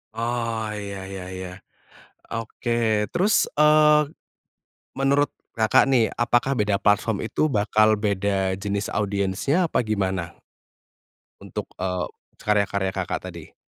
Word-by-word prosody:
Oh 115 -2 -2
ya 100 -2 -6
ya 95 -1 -7
ya. 95 -1 -6 0.8
Oke, 115 -1 -1
terus, 205 +5 +3
eee, 150 0 +5 0.9
menurut 140 +1 +2 0.2
Kakak 110 -2 +4
nih, 125 -5 +3
apakah 120 +3 +1
beda 105 -2 +1
platform 105 0 +2
itu 115 - 0
bakal 110 -4 +3
beda 100 -2 0
jenis 100 +1 -3
audiensnya 105 - 0
apa 120 - 0
gimana? 95 -5 -2 1.1
Untuk, - - -6
e 95 - -4 0.5
karya-karya 100 -2 0
Kakak 95 -1 -3
tadi. 85 -4 -10
105 Hz, 110 wpm, -24 LUFS, 100-120 Hz, 1.1 s, eee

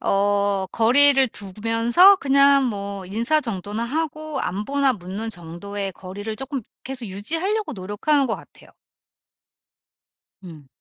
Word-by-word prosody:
어 200 -1 +1
거리를 270 +4 +6
두면서 230 - +3
그냥 275 -2 +4
뭐 200 -4 -4
인사 230 +11 0
정도나 210 -3 -5
하고 310 +1 -3
안부나 270 +8 0
묻는 200 +3 -6
정도의 195 +2 -7
거리를 205 +4 -7
쪼끔 270 0 -5 0.2
계속 260 -2 -6
유지하려고 330 - -2
노력하는 210 +9 0
것 225 - -2
같아요. - - -17 1.7
음. 155 -6 -12
225 Hz, 255 characters per minute, -22 LUFS, 200-275 Hz, 1.7 s, 거리를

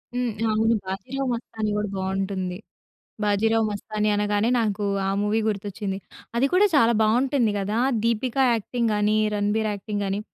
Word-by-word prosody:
హ్మ్. 245 -1 0 0.2
అవును 225 +2 +2
'బాజీరావు 245 +9 -4
మస్తాని' 220 -2 -3
గూడా 210 0 -1
బావుం‌టుంది. 190 -1 -2 0.7
'బాజీరావు 220 +2 +2
మస్తాని' 210 +1 -2
అనగానే 205 +2 +1
నాకు 210 -2 -1 0.2
ఆ - - +1
మూవీ 210 +2 +1
గుర్తొచ్చింది. 200 -1 -3 0.4
అది 265 +3 +3
కూడా 380 +3 +6
చాలా 235 -4 +5
బావుంటుంది 240 0 +2
గదా! 205 +3 -1 0.2
'దీపిక' 235 +3 0
యాక్టింగ్ 230 +1 -1
గాని, 210 +1 +2 0.2
'రణబీర్' 210 +1 0
యాక్టింగ్ 205 0 -4
గాని 195 +1 -1
215 Hz, 140 wpm, -24 LUFS, 205-230 Hz, 0.7 s, కూడా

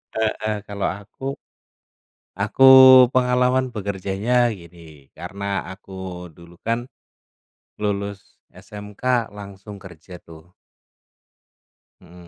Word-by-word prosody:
Heeh. 110 -1 -1
Kalau 100 -1 -3
aku, 100 +6 -13 1.2
aku 105 +6 0 0.5
pengalaman 125 +1 +2
bekerjanya 100 +3 -3 0.2
gini, 85 -1 -16 0.3
karena 100 0 -9 0.3
aku 95 0 -14 0.4
dulu 85 +2 -17
kan 115 +1 -1 1.0
lulus 100 -1 -5
SMK 105 +4 -4
langsung 100 0 -10
kerja 90 -1 -13
tuh. 80 +2 -16 1.5
Heeh. 90 -1 -16
100 Hz, 85 wpm, -21 LUFS, 95-110 Hz, 1.5 s, pengalaman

